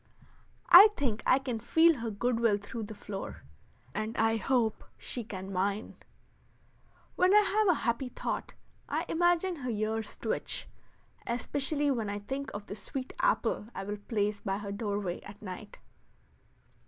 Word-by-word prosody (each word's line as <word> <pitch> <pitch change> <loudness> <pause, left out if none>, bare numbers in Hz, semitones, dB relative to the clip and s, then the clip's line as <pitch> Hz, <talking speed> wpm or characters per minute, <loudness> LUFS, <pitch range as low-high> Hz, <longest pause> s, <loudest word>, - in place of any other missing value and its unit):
I 420 - +12
think 230 -6 0
I 255 - +6
can 255 -4 -3
feel 325 +6 +4
her 230 0 -2
good 230 +3 0
will 225 -3 +3
through 215 +2 -6
the 215 +1 -8
floor, 200 -1 -7 0.5
and 215 +2 -3
I 225 0 +3
hope 230 -2 +1
she 245 - -4
can 195 -2 -7
mine. 200 +3 -1 1.2
When 370 +3 +4
I 420 - +9
have 420 +1 +2
a 350 -5 +3
happy 235 +2 0
thought - - -4 0.3
I - - -1
imagine 350 +1 +2
her 255 -3 -4
ears 220 0 -2
twitch, - - -3 0.6
especially 280 +5 0
when 225 -5 -1
I 205 - -2
think 265 +7 -4
of 205 0 -6
the - - -6
sweet 255 +6 -6
apple - - +1
I 195 - -4
will 205 +1 -4
place 205 0 -1
by 195 0 -2
her 200 -1 -5
doorway 200 -3 -2
at 200 +1 -11
night. 205 +1 -8
225 Hz, 155 wpm, -30 LUFS, 205-270 Hz, 1.2 s, I